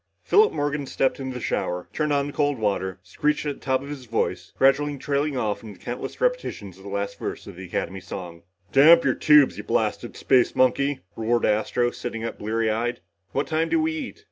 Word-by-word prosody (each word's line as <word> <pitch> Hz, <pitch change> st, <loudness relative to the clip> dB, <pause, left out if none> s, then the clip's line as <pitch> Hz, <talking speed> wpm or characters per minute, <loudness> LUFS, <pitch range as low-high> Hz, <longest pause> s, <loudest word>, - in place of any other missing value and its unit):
Philip 430 Hz, +1 st, +5 dB
Morgan 145 Hz, -1 st, -2 dB
stepped 135 Hz, +1 st, 0 dB
into 130 Hz, -1 st, -5 dB
the -, -, -4 dB
shower, 90 Hz, -5 st, -2 dB
turned 150 Hz, -1 st, 0 dB
on 140 Hz, -1 st, +2 dB
the 145 Hz, -, -6 dB
cold 145 Hz, -2 st, +1 dB
water, 100 Hz, -4 st, -1 dB
screeched 150 Hz, 0 st, -1 dB
at 145 Hz, -1 st, -2 dB
the -, -, -28 dB
top 130 Hz, 0 st, +1 dB
of 140 Hz, -, -9 dB
his 140 Hz, -3 st, -7 dB
voice, 115 Hz, -1 st, -2 dB
gradually 145 Hz, +2 st, +3 dB
trailing 140 Hz, 0 st, -1 dB
off 110 Hz, -4 st, -1 dB
into 105 Hz, -4 st, -11 dB
countless 120 Hz, +1 st, -6 dB
repetitions -, -, -2 dB
of -, -, -15 dB
the 100 Hz, -, -8 dB
last 100 Hz, 0 st, -3 dB
verse -, -, -5 dB
of -, -, -10 dB
the 95 Hz, +2 st, -8 dB
Academy 95 Hz, +2 st, -3 dB
song. 90 Hz, -2 st, -8 dB, 0.3 s
"Damp 165 Hz, +5 st, +7 dB
your -, -, +3 dB
tubes, 150 Hz, -3 st, +5 dB
you -, -, -5 dB
blasted -, -, -1 dB
space 125 Hz, -2 st, +3 dB
monkey," 135 Hz, +2 st, +2 dB
roared 115 Hz, +1 st, +1 dB
Astro, 120 Hz, +3 st, +1 dB
sitting 115 Hz, -2 st, -5 dB
up 115 Hz, -, -5 dB
bleary 110 Hz, +1 st, 0 dB
eyed. 120 Hz, +3 st, -1 dB, 0.3 s
"What 140 Hz, -, 0 dB
time 160 Hz, +1 st, 0 dB
do 330 Hz, -, +2 dB
we 320 Hz, 0 st, +1 dB
eat?" 310 Hz, +3 st, -6 dB
130 Hz, 210 wpm, -24 LUFS, 110-145 Hz, 0.3 s, Damp